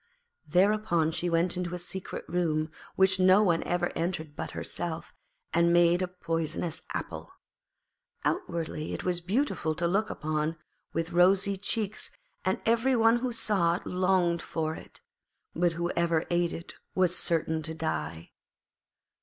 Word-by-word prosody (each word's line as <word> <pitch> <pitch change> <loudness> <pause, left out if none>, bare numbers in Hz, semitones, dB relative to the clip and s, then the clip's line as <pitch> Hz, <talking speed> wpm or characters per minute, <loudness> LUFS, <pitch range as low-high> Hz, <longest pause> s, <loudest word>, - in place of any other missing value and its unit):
Thereupon 180 -1 +3
she 175 +2 -1
went 170 +2 +2
into 180 -1 -3
a - - -3
secret 180 +2 -6
room, 155 -3 0 0.2
which 190 0 +4
no 185 +3 +6
one 170 -5 +3
ever 175 0 0
entered 160 -3 -3
but - - -4
herself, 170 0 -4 0.4
and 170 0 +4
made 175 +1 +5
a 185 - 0
poisonous 165 -2 -3
apple. - - -5 0.9
Outwardly 160 -2 -2
it - - -6
was 175 -1 0
beautiful 185 - 0
to 170 +2 0
look 200 +5 +1
upon, 155 +1 -2 0.3
with 165 +1 -2
rosy 190 +3 +4
cheeks, 210 +1 -2 0.3
and - - 0
every 235 +3 +3
one 225 0 +5
who 250 +1 -2
saw 195 -7 +2
it - - -7
longed 180 -2 +2
for 160 -1 -2
it, - - -12 0.5
but 175 0 +2
whoever 170 -1 0
ate 175 0 +2
of - - -5
it - - -11 0.2
was 185 -1 +3
certain 160 -2 +1
to 160 +1 -4
die. 80 - -3
175 Hz, 145 wpm, -29 LUFS, 165-185 Hz, 0.9 s, no